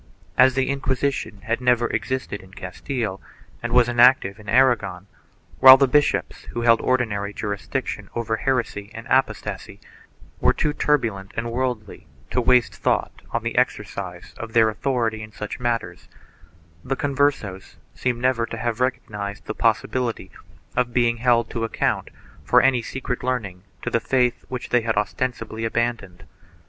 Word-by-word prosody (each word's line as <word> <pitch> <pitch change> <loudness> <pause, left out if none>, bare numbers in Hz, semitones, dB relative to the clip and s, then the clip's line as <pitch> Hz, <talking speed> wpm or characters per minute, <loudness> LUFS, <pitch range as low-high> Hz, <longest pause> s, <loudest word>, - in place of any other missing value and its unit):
As 130 -1 +5
the 135 0 +1
Inquisition 135 -5 -2
had 115 +5 -2
never 125 -1 +3
existed 130 -6 -3
in 95 0 -17
Castile 100 +2 -4 0.4
and 120 - -4
was 120 -1 +5
inactive 120 -4 +4
in 105 -1 -10
Aragon, 110 -7 +2 0.5
while 130 0 +11
the 135 0 +4
bishops, 145 +3 +1
who 120 - -5
held 115 -1 +4
ordinary 105 -5 0
juris 100 -2 -4
diction 115 -6 -3
over 115 -1 -1
heresy 115 -6 -1
and 115 +1 -8
apostasy, 130 0 -1 0.6
were - - +4
too 150 -1 0
turbulent 115 -11 0
and 115 +1 -2
worldly 120 -4 -3 0.2
to 125 - +1
waste 125 0 +3
thought - - -1
on - - -2
the - - -3
exercise - - -2
of 115 -1 -7
their 110 -1 +5
authority 115 -1 -1
in 105 0 -9
such 105 -1 -6
matters, 120 -2 -3 0.7
the 135 - -1
Converses 135 -9 -1 0.2
seem 125 -2 -1
never 125 -2 +1
to - - -6
have 120 -2 -2
recognized 105 -6 -3
the - - -4
possibility 125 -3 0 0.4
of 120 -1 0
being 120 -1 +3
held 120 0 +3
to 115 - -3
account 115 - -1 0.3
for - - +5
any 130 -2 +3
secret 125 +1 -4
leaning 110 -8 -2 0.2
to - - -2
the 115 - +2
faith 125 -1 0
which 125 -1 -6
they 125 - +3
had 110 -2 -1
ostensibly 115 +1 -2
abandoned. 115 -6 -2
120 Hz, 155 wpm, -23 LUFS, 110-130 Hz, 0.7 s, while